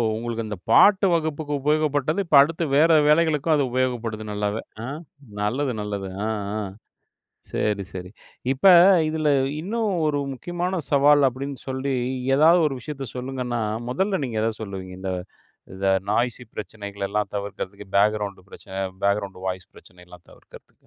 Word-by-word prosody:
உங்களுக்கு 115 0 -3
இந்த 105 -3 -5
பாட்டு 200 -1 +6
வகுப்புக்கு 155 -2 -1
உபயோகப்பட்டது. 150 +2 +1
இப்ப 155 - +2
அடுத்து 165 +3 0
வேற 160 +3 +5 0.2
வேலைகளுக்கும் 155 0 +3
அது 145 - +2
உபயோகப்படுது 120 -4 -1
நல்லாவே. 105 +1 -2 0.2
ஆ, - - -4 0.5
நல்லது, 130 +6 0
நல்லது. 100 -2 -4 0.2
ஆ - - -1 0.3
ஆ, - - -2 0.9
சரி, 100 -2 -1
சரி. 90 -1 -7 0.4
இப்ப 135 - -9 0.4
இதில 155 -1 0 0.3
இன்னும் 215 +4 -1 0.2
ஒரு 145 -1 +1
முக்கியமான 175 +5 -3
சவால் 145 0 +5
அப்படின்னு 135 +2 -6
சொல்லி 130 +1 -2 0.4
ஏதாவது 165 +4 +6
ஒரு 140 - -1
விஷயத்த 140 -1 -6
சொல்லுங்கன்னா, 125 -2 -3 0.3
முதல்ல 190 +7 0
நீங்க 115 -4 -3
எத 115 - +1
சொல்லுவீங்க? 95 -3 -7
இந்த, 95 0 -3 0.6
இந்த 95 +1 -3 0.2
நாய்சி 120 +2 0
பிரச்சனைகளெல்லாம் 100 0 -4
தவிர்க்கிறதுக்கு. 100 0 -6
பேக்கிரவுண்ட் 100 -2 +1
பிரச்சன, 95 0 -6 0.2
பேக்கிரவுண்ட் 100 -2 0
வாய்ஸ் 90 -1 -4
பிரச்சனையெல்லாம் 90 -1 -16
தவிர்க்கிறதுக்கு. - - -18
125 Hz, 130 wpm, -24 LUFS, 100-150 Hz, 0.9 s, பாட்டு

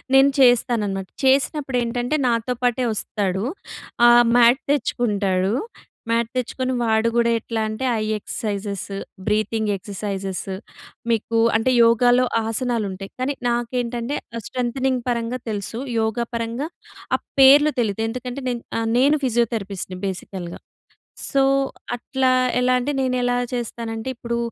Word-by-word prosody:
నేను 275 +1 +6
చేస్తాననమాట. 225 -6 +3 0.2
చేసినప్పుడు 270 0 +2
ఏంటంటే 245 +4 -1
నాతో 235 +1 0
పాటే 245 0 +1
వస్తాడు. 200 -2 -1 0.6
ఆహ్, 240 0 +7
మ్యాట్ 240 +3 +5
తెచ్చుకుంటాడు. 200 -8 0 0.6
మ్యాట్ 230 0 +1
తెచ్చుకొని 255 +1 -2
వాడు 220 0 +2
కూడా 235 0 +3
ఎట్లా 225 0 -3
అంటే, 215 +5 -3 0.2
ఐ 215 - -1
ఎక్సర్‌సై‌జెస్ 205 -2 -4 0.4
బ్రీతింగ్ 215 0 0
ఎక్సర్‌సైజెస్. 195 -1 -5 0.6
మీకు 230 +1 0 0.2
అంటే 255 +3 +1
యోగాలో 245 +2 +4 0.2
ఆసనాలు 230 -1 -1
ఉంటాయి. 195 +1 -8
కాని 280 +2 0 0.2
నాకేంటంటే, 240 +2 -2 0.3
స్ట్రెంగ్తనింగ్ 255 0 -1
పరంగా 235 +1 -1
తెలుసు. 210 +2 -4 0.2
యోగా 220 +2 -1
పరంగా 230 +6 -2 0.5
ఆ - - -25 0.2
పేర్లు 290 +3 +7
తెలియదు. 220 0 -1
ఎందుకంటే 250 +3 -5
నేను 240 -1 -3 0.2
ఆహ్, 225 0 -1
నేను 285 +4 +4
ఫిజియోథెరపిస్ట్‌ని 210 -6 -2
బేసికల్‌గా. 185 -2 -6 0.7
సో, 275 -1 +3 0.5
అట్లా 260 +2 0 0.3
ఎలా 250 0 +2
అంటే 290 +4 -1
నేను 255 -1 0
ఎలా 245 0 +1 0.2
చేస్తానంటే, 230 0 -4
ఇప్పుడు 235 0 -3
235 Hz, 120 wpm, -22 LUFS, 215-255 Hz, 0.7 s, ఆహ్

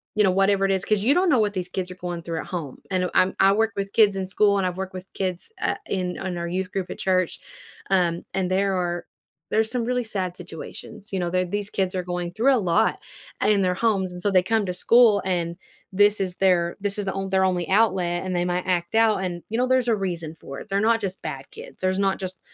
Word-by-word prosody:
you 210 - +4
know, 190 - +4
whatever 195 +1 +3
it 195 - +1
is 190 -1 0
'cause 210 -2 +1
you 260 +6 +4
don't 360 +2 +3
know 265 -6 +4
what 210 -2 +1
these 180 -2 -4
kids 180 0 -3
are - - -8
going 175 -2 -5
through 165 -2 -3
at - - -6
home. 160 -7 -6
I 185 - +2
know, 180 - -1
I'm 185 +1 +3
I 195 0 +6
work 220 +2 +2
with 200 0 -3
kids 210 -3 +5
in 190 -1 -3
school, 200 +1 +3
and 190 -2 +1
I've 180 - -3
worked 190 0 -5
with 185 +1 -9
kids, 185 - -3
uh, - - +1
in 180 -2 -2
on 180 -2 -4
our 170 - -3
youth 185 +1 -2
group 190 -2 -2
at - - -7
church, 185 -2 +1 0.5
um, 175 -3 +1
and 185 -1 -1
there 195 +1 +2
are 175 -1 -2 0.5
there 220 - +2
are - - +2
some 235 +2 -2
really 250 0 0
sad 185 -4 -3
situations, 180 +4 -9
you 190 - 0
know? 175 -1 -1
Their 185 0 +2
these 205 +2 -3
kids 190 -1 -1
are 185 - -1
going 175 -1 -4
through 255 +5 +3
a - - +2
lot 205 +3 +2 0.4
in 205 -2 +3
their 180 -1 +2
homes, 195 -4 0
and 180 - -8
so 205 - +1
they 185 -2 +4
come 220 +3 +1
to 180 - -2
school, 225 +1 +5
and 170 -2 -1 0.4
this 205 +1 +4
is 185 -2 -2
their 175 -3 +2
this 205 0 -2
is 205 - -2
the 190 - -2
on 195 0 -3
their 190 0 +2
only 180 -3 0
outlet, 190 -4 +2
and 185 -1 -2
they 175 0 +1
might 180 0 -1
act 175 -2 0
out 220 -3 +3
and, 175 -1 -3
you 225 - -2
know, 250 - +3
there's 255 -1 +2
a 225 - +4
reason 170 -5 -4
for 135 0 -8
it. - - -12
They're 195 0 +1
not 225 +1 +3
just 195 -2 -4
bad - - -6
kids. - - -11
There's 185 0 +1
not 195 -1 +1
just, 185 -2 -5
190 Hz, 265 wpm, -24 LUFS, 180-205 Hz, 0.5 s, I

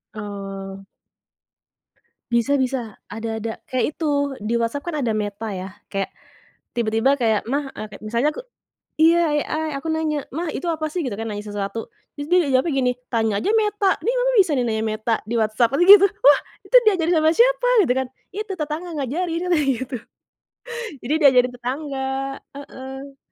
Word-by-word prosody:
Oh. 195 -2 -7 1.5
Bisa 235 +4 +2
bisa, 255 -5 -2 0.2
ada 225 +2 -4
ada 225 +1 -3 0.2
kayak 255 -1 0
itu 285 -3 -1
di 225 +2 0
WhatsApp 235 +5 -1
kan 340 - -2
ada 235 - +1
Meta 215 0 -3
ya 190 0 -5 0.2
kayak, 195 -1 -2 0.7
tiba-tiba 230 +3 +2
kayak, 220 -3 +2
“Ma," 280 +1 -1
eee, 215 - -6
kayak 205 - -12
misalnya 235 +7 +1
aku - - -5 0.6
iya 335 +2 +6 0.3
AI 315 0 -2
aku 275 - -6
nanya, 310 -2 -1
"Ma, 335 +4 -2
itu 350 - -4
apa 310 -1 -2
sih?” 355 +2 -2
Gitu 250 - -3
kan 225 +2 -5
nanya 205 0 -5
sesuatu, 205 +1 -4 0.3
terus 290 0 -6
dia 360 -4 +4
jawabnya 265 +5 +2
gini, 250 -1 +2 0.2
“tanya 225 -4 +1
aja - - -1
Meta 420 -2 +2
nih 480 - +1
Mama - - +2
bisa 365 -5 +4
nanya 225 -3 0
Meta 215 +1 -1
di 230 +3 -3
WhatsApp,” 220 +2 +2
katanya 350 +6 +3
gitu, 395 +1 +4
"wah! 290 -6 +4 0.3
itu - - -1
diajarin 355 -4 +3
sama 315 0 +4
siapa?" - - +4 0.2
Gitu 250 - +2
kan, 265 -1 0 0.3
“itu 425 +1 -4
tetangga 305 +4 -3
ngajarin,” 330 +6 -2
katanya 305 -5 +2
gitu. 260 0 -4 1.1
Jadi 275 - 0
diajarin 250 -3 +5
tetangga, 265 +2 -4 0.5
heeh. 270 0 -9
265 Hz, 165 wpm, -22 LUFS, 225-315 Hz, 1.5 s, iya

